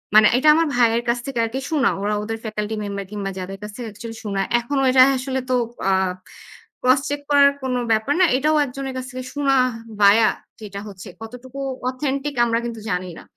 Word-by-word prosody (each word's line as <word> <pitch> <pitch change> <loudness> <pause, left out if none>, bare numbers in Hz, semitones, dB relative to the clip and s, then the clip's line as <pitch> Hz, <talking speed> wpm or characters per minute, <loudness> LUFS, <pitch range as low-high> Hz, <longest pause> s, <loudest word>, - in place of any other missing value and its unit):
মানে 215 -1 +8
এটা 280 +4 +1
আমার 330 0 +2
ভাইয়ের 235 -1 +3
কাছ 240 +1 +1
থেকে 270 -4 -3
আরকি 235 +4 -4
শোনা। 295 -7 +2
ওরা 205 +1 0
ওদের 225 +1 -4
ফ্যাকাল্টি 215 -1 -3
মেম্বার 200 -1 -4
কিংবা 200 -2 -4
যাদের 190 +1 -6
কাছ 210 0 -7
থেকে 245 - -6
অ্যাকচুয়ালি 225 +2 -8
শোনা। 200 -2 -1 0.2
এখনও 270 +3 -1
এটা 255 0 +6 0.2
আসলে 265 0 -2
তো - - +1 0.4
আ - - +3 0.9
ক্রস 255 +2 +4
চেক 290 0 -3
করার 280 -1 +6
কোনো 255 -1 -1
ব্যাপার 220 +6 +2
না। - - +7
এটাও 305 +3 +2
একজনের 270 0 -6
কাছ 255 - -4
থেকে 255 0 -6
শোনা 280 -1 +1 0.5
ভায়া 210 +2 +6 0.3
যেটা 200 -2 -7
হচ্ছে। 195 0 -10
কতটুকু 250 +4 -9 0.3
অথেন্টিক 275 +2 -3
আমরা 230 -1 +1
কিন্তু 230 -2 -6
জানি 180 0 -2
না। - - -13
240 Hz, 195 wpm, -21 LUFS, 210-270 Hz, 0.9 s, মানে